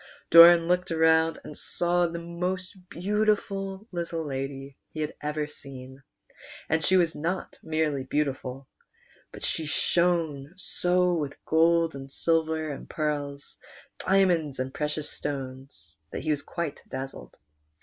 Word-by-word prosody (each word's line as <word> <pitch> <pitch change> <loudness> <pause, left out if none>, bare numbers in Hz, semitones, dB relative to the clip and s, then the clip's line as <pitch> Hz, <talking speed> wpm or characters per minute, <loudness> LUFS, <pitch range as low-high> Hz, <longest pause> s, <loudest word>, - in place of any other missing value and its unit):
Doran 170 0 +9
looked 180 +1 +1
round 160 0 +3
and 150 - -9
saw 175 0 +2
the 170 0 -5
most 180 +3 -4
beautiful 200 0 -1
little 170 -2 -3
lady 135 0 -5 0.2
he 155 - -3
had 150 - -2
ever 150 0 -2
seen; 135 -2 -10 0.7
and 160 -1 +1
she 185 +4 +4
was 170 -2 +3
not 170 +5 -3
merely 155 -4 -1
beauti 140 0 0
ful, 130 +1 -8 0.6
but - - -7
she 160 - -2
shone 165 -2 0
so 180 +1 +2
with 150 -4 -4
gold 165 +1 +3
and 135 0 -8
silver 160 0 +1
and 140 - -8
pearls, 145 -2 -3 0.4
dia 195 +1 +4
monds 160 -7 0
and 130 +1 -3
precious 150 0 -2
stones, 135 - -7
that - - -5
he 155 - 0
was 145 -1 0
quite 170 -2 -4
dazzled. 135 +1 -7
160 Hz, 140 wpm, -27 LUFS, 140-175 Hz, 0.7 s, Doran